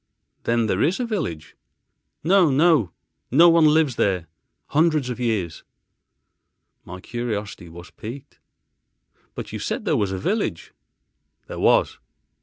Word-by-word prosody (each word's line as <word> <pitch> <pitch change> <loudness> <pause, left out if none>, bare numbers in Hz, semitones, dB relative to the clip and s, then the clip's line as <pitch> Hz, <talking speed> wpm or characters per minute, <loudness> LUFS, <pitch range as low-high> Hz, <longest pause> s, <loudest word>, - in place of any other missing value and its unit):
"Then 115 -1 +1
there 100 -2 0
is 175 - +1
a 250 - -1
village?" 135 - -4 0.7
"No, 180 0 +4
no. 145 - +3 0.4
No 165 +7 +6
one 165 -2 +5
lives 150 -4 +2
there 90 -4 +1 0.4
hundreds 155 -4 +2
of 125 - -6
years." 105 -9 -2 1.2
My 90 +1 -9
curiosity 105 -5 -5
was 85 +1 -12
piqued, 130 +6 -10 1.0
"But - - -7
you - - -4
said - - -3
there - - +1
was 100 -2 0
a 95 - -3
village." 145 - -2 0.7
"There - - -8
was." - - +2
120 Hz, 130 wpm, -23 LUFS, 95-160 Hz, 1.2 s, No